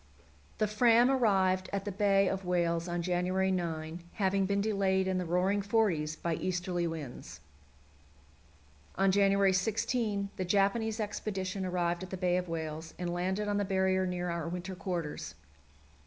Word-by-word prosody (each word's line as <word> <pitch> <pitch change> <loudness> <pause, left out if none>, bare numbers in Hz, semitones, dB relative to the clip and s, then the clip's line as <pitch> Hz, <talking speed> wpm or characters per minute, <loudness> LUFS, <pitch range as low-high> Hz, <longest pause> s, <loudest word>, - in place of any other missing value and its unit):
The 215 - +2
Fram 235 +4 +4
arrived 190 -7 +2
at 195 0 -2
the 205 - -2
Bay 195 0 +3
of 195 +1 -2
Whales 170 -1 0
on 175 0 -2
January 185 +2 +1
9, 165 -2 -3
having 195 -1 +1
been 200 0 +1
delayed 195 -2 +1
in 185 -1 0
the 180 - -3
"Roaring 185 +4 +1
Forties" 195 -8 +1
by 170 +1 -2
easterly 175 0 -1
winds. 155 -6 -7 1.6
On 195 +1 +3
January 195 0 +4
16 205 +1 0
the 185 - -1
Japanese 205 +4 +1
expedition 195 -3 -3
arrived 175 -1 -1
at 185 - -6
the 190 - -5
Bay 180 -1 +1
of 180 -1 -3
Whales, 160 0 -5
and 175 -1 -3
landed 190 +4 -1
on 205 0 0
the 205 - +1
Barrier 190 -1 +1
near 180 -1 -2
our 170 -1 -3
winter 180 +2 -5
quarters. 180 - -4
185 Hz, 155 wpm, -31 LUFS, 175-200 Hz, 1.6 s, Fram